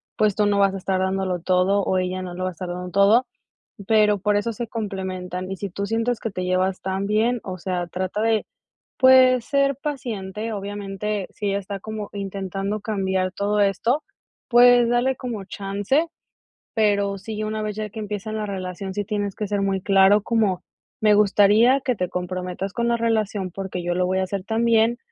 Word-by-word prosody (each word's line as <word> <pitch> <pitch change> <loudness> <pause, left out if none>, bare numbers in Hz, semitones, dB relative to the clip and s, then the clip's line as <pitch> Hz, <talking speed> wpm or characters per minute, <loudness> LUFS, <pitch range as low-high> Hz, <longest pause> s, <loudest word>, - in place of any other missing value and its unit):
pues, 215 -2 +2
tú 210 - +2
no 205 -1 +2
vas 195 -1 +3
a - - -3
estar 190 0 -1
dándolo 190 -1 -1
todo, 185 +3 +2
o 185 - +1
ella 185 0 -1
no 180 -1 -6
lo 185 - -4
va 185 - 0
a - - -6
estar 180 +1 -7
dando 180 +1 -5
todo, 205 +6 +5 0.6
pero, 210 -2 +4
por 205 +1 +2
eso 230 +3 -1
se 235 +2 -5
complementan, 190 -4 -4
y 195 - -4
si 200 +2 -4
tú 200 +3 -4
sientes 230 +1 0
que 225 - -4
te 185 -1 -4
llevas 185 +1 0
tan 190 +1 -2
bien, 225 +3 +1
o 185 -1 -5
sea, 180 -1 -2
trata 185 +4 -3
de, 225 -1 +1 0.5
pues, 255 -2 +6
ser 275 -1 +2
paciente, 225 -7 -4
obviamente, 200 0 -4
si 205 - -4
ella 200 0 0
está 200 0 -6
como 215 0 -6
intentando 195 +1 -3
cambiar 190 -3 -1
todo 205 +1 0
esto, 230 +9 +1 0.5
pues, 245 0 +6
dale 245 +2 +2
como 230 -6 -5
chance, 205 - -1 0.7
pero 200 -3 +1
sí, 215 +2 -5
una 215 0 -3
vez 210 -1 -3
ya 215 0 -3
que 220 +2 -8
empiecen 210 +1 -4
la 215 - -2
relación, 190 0 -5
sí 205 - -1
tienes 205 -2 -2
que 210 - -3
ser 205 0 -1
muy 195 -1 0
claro, 195 +1 +5
como: 215 -6 +1 0.4
"Me 215 -1 +5
gustaría, 210 +5 +5
que 255 -2 0
te 180 -3 -1
comprometas 180 +1 -4
con 235 0 -1
la 235 - +2
relación, 215 -4 -1
porque, 185 -1 -5
yo 175 - 0
lo 180 0 +1
voy 185 +1 0
a 190 - +1
hacer 190 0 -3
también, 230 +1 +2
200 Hz, 195 wpm, -23 LUFS, 190-220 Hz, 0.7 s, pues